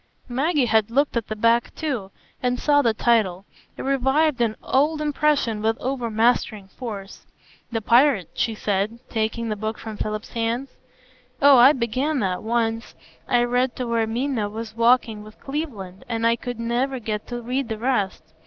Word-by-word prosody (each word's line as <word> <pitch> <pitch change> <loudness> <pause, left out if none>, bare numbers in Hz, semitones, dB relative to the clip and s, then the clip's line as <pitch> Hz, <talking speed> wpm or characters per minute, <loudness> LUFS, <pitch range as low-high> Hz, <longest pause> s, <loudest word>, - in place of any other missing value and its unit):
Maggie 275 +3 +1
had 220 -1 +2
looked 275 +4 +1
at 230 -2 -1
the 215 - -4
back 230 +2 +2
too, 260 -12 -3 0.3
and 250 0 0
saw 290 -1 +4
the 235 - +3
title; 215 -5 +1 0.3
it - - -5
revived 270 +1 +2
an 225 -2 +1
old 300 +4 +2
impression 295 -7 +1
with 225 +1 +1
overmastering 230 -5 0
force. 205 -4 -8 0.4
"'The 225 -1 -1
Pirate,'" 240 - +4
she 225 - -1
said, 205 +2 -1
taking 225 +1 -2
the 215 - -1
book 215 +1 -4
from 220 -2 -8
Philip's 215 0 -4
hands. 235 +3 -2 0.7
"Oh, 280 -1 +7
I 260 +4 +8
began 255 +5 -1
that 185 -2 -1
once; 225 0 -1 0.3
I 240 -1 +3
read 245 +1 0
to 255 - -3
where 230 -1 0
Minna 235 -2 -1
is 225 -1 -6
walking 230 -2 +3
with 215 0 -14
Cleveland, 235 - -5
and 230 -1 -1
I 230 0 +4
could 245 0 -6
never 245 +3 -1
get 215 -3 -4
to 240 -1 -4
read 250 +1 -2
the 220 - -3
rest. 225 -5 -1
235 Hz, 170 wpm, -23 LUFS, 220-260 Hz, 0.7 s, I